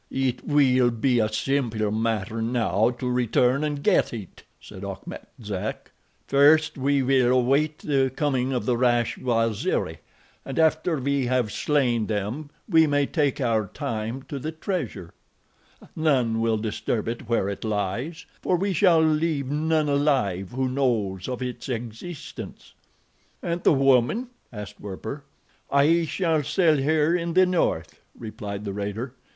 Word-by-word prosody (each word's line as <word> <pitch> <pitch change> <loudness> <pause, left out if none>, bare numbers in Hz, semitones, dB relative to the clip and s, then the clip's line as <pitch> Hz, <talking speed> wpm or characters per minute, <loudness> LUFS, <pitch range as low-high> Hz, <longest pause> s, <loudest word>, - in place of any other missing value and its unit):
"It 130 -2 -1
will 130 -4 +3
be 120 +1 +1
a 110 -1 +1
simple 115 -4 0
matter 110 0 -1
now 115 -2 +1
to 125 - -3
return 125 +2 +2
and 145 -2 -2
get - - +3
it," 105 -6 -8 0.2
said 95 - -11
Achmet 100 -1 -7 0.2
Zek. 100 -3 -5 0.4
"First 150 +3 +4
we 140 0 +1
will 130 -1 +3
await 140 +5 +2
the 135 -3 +1
coming 135 -4 0
of 125 -2 -2
the 125 - +2
rash 120 -1 +1
Waziri, 115 -4 0 0.4
and 135 - -6
after 160 +1 +2
we 140 -1 0
have 125 -4 +1
slain 120 -3 +1
them 110 +8 -3 0.2
we 160 -6 +5
may 145 -1 +2
take 145 -2 0
our 115 -5 +1
time 120 -2 -4
to 140 - -6
the 155 +4 -4
treasure—none 140 - -3
will 115 -1 +1
disturb 110 +1 -2
it 115 0 -5
where 115 -5 +1
it 100 - -5
lies, 110 - -3 0.2
for 185 - +1
we 195 +2 0
shall 175 -3 +4
leave 155 -3 +1
none 155 +1 +1
alive 135 -11 +1
who 130 +1 -1
knows 115 -8 -1
of 125 0 -3
its 125 +1 -6
existence. 120 +7 -7 0.7
"And 170 0 -2
the - - +4
woman?" 135 - +3 0.2
asked 105 -3 -8
Werper. 110 +8 -7 0.4
"I 160 +4 +3
shall 160 -1 0
sell 155 +1 +2
her 155 +3 +2
in 170 -1 -2
the 185 0 +6
north," 170 - -1 0.2
replied 105 -2 -6
the 100 - -3
raider. 105 +5 -4
130 Hz, 145 wpm, -25 LUFS, 115-150 Hz, 0.7 s, the